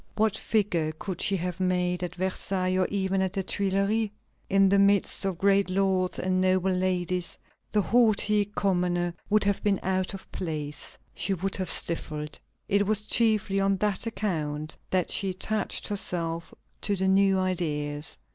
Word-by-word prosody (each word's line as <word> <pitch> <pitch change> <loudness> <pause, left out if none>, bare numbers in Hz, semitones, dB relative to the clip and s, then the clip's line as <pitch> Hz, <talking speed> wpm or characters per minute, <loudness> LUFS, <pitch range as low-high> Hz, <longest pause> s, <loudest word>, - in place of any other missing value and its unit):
What 220 -1 +2
figure 180 -8 0
could 180 +2 -6
she 195 - +2
have 180 +1 -4
made 180 -1 0
at 180 -1 -4
Versailles, 185 0 -1
or 185 -1 +2
even 195 -1 0
at 190 -1 -1
the 195 -2 -2
Tuileries? 200 +3 0 0.4
In 195 0 +5
the 200 +1 +4
midst 200 0 +3
of 190 -3 -1
great 195 +1 +3
lords 185 -1 +1
and 185 0 0
noble 185 0 +2
ladies 180 -1 -1 0.3
the 210 -1 +2
haughty 210 -3 +3
commoner 180 -4 0 0.2
would 215 0 +3
have 200 0 +1
been 200 -2 +2
out 185 +1 -1
of 195 - -12
place; 150 -4 -5 0.2
she 190 +3 -1
would 190 +2 -2
have 185 -2 -1
stifled. 150 -2 +1 0.3
It 200 0 +2
was 210 0 +2
chiefly 215 -4 +2
on 195 0 +2
that 210 +2 -1
account 155 -9 -3
that 185 -2 0
she 195 - 0
attached 210 +4 -2
herself 170 -4 -2 0.3
to 205 - 0
the 190 0 0
new 195 0 +4
ideas. 150 -5 -2
190 Hz, 160 wpm, -27 LUFS, 180-200 Hz, 0.4 s, In